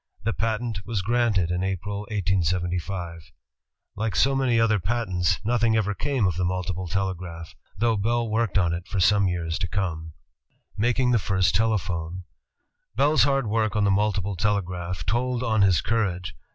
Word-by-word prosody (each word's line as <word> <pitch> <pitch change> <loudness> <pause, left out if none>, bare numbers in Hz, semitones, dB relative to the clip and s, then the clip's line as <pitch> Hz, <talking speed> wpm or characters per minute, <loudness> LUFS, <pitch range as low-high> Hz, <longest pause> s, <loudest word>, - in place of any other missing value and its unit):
The 115 +1 0
patent 110 -1 -2
was 105 -3 -2
granted 110 -5 +1
in 90 0 -1
April, 95 +2 -3
1875. 90 -3 -2 0.7
^^^ 110 +1 -1
^ 135 0 0
many 125 -3 +2
other 110 -2 +3
patents, 95 -4 0
nothing 115 -1 +2
ever 105 -1 0
came 135 0 0
of 90 -3 0
the 90 - 0
multiple 90 0 -2
telegraph, 90 -3 -4 0.2
though 115 +2 +2
Bell 115 +3 0
worked 110 -2 0
on 85 -3 +2
it 85 +1 -5
for 100 - -2
some 100 +1 +4
years 85 -2 -2
to 95 - -1
come. 80 -5 -3 0.6
Making 125 +3 +1
the 120 - +3
First 95 0 +1
Telephone 90 -5 -1 0.7
Bell's 145 +5 +4
hard 135 -2 +1
work 110 -1 0
on 105 - +2
the 100 - +3
multiple 100 -1 0
telegraph 90 -3 -2
told 125 +4 0
on 110 -4 +2
his 95 -6 +4
courage. 95 -5 -1
100 Hz, 160 wpm, -25 LUFS, 90-115 Hz, 0.7 s, some